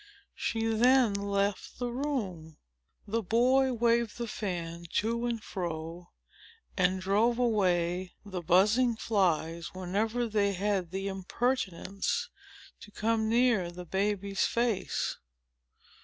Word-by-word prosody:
She 225 0 -2
then 235 +1 +4
left 200 0 -1
the 245 -1 -2
room. 205 - -3 0.5
The 225 +3 0
boy 255 +6 +3
waved 235 -1 +1
the 235 -1 -3
fan 170 -5 -4
to 235 +2 0
and 230 -2 -3
fro, 170 -1 -5 0.7
and 185 0 +2
drove 210 +5 +2
away 185 -6 +1
the 190 -3 -5
buzzing 210 +8 +4
flies 170 -6 0
whenever 210 +6 -1
they 205 -2 +1
had 195 -2 -1
the 195 +2 -3
impertinence 195 - -1 0.5
to - - -12
come 220 +1 0
near 230 -6 +3
the 175 +1 -9
baby's 200 +1 0
face. 230 -5 0
205 Hz, 110 wpm, -30 LUFS, 185-235 Hz, 0.7 s, then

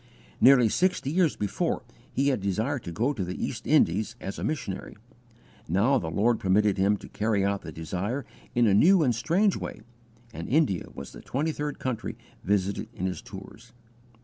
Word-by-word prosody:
Nearly 125 -3 +7
sixty 175 - +1
years 170 -2 +2
before 135 - -1 0.3
he 140 +2 +1
had 130 -7 0
desired 110 +8 -1
to 85 - -4
go 120 - 0
to 105 -8 -3
the 90 +1 -4
East - - -4
Indies 105 +7 +3
as 95 - -6
a - - -4
missionary; 105 -14 -4 0.7
now 110 - +3
the 80 - -4
Lord 110 +7 +2
permitted 100 +1 +2
him 100 +2 +3
to - - -11
carry 105 -2 0
out 100 0 0
the 80 - -8
desire 95 - -3 0.3
in 120 0 +4
a 105 - +4
new 170 - +6
and 125 -4 +3
strange 180 - +2
way, - - -6 0.5
and 85 - -6
India 135 - +2
was 70 -1 -8
the - - -11
twenty 150 +5 -1
third 150 -1 -4
country 120 -4 -4 0.3
visited 100 0 0
in 90 - -3
his 95 -1 -3
tours. 100 +4 -12
110 Hz, 180 wpm, -27 LUFS, 95-140 Hz, 0.7 s, Nearly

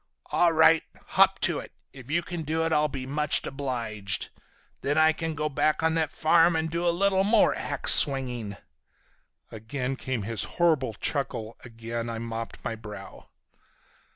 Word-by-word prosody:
'All 175 -1 +3
right, 160 0 +5 0.3
hop - - +4
to - - +2
it. - - -10 0.2
If 130 -2 -13
you 170 +3 0
can 175 -2 -5
do 160 +1 -1
it 165 - 0
I'll 150 0 +3
be 135 -3 -6
much 150 +3 +1
obliged. 115 -8 -3 0.5
Then 145 +2 -1
I 160 0 +5
can 160 0 -4
go 150 +1 -1
back 150 +2 0
on 160 0 +2
that 160 -2 0
farm 165 +1 +3
and 160 0 -1
do 170 +1 -1
a - - +5
little 190 +2 +2
more 215 +2 +4
ax - - +2
swinging!'" 125 -7 +1 0.9
Again 125 +4 -4
came 130 -4 -4
his 115 +1 -1
horrible 155 -10 +2
chuckle, 115 -4 -2
again 115 0 -6
I 115 - -4
mopped 115 0 -6
my - - -2
brow. 105 -3 -10
140 Hz, 165 wpm, -26 LUFS, 115-160 Hz, 0.9 s, right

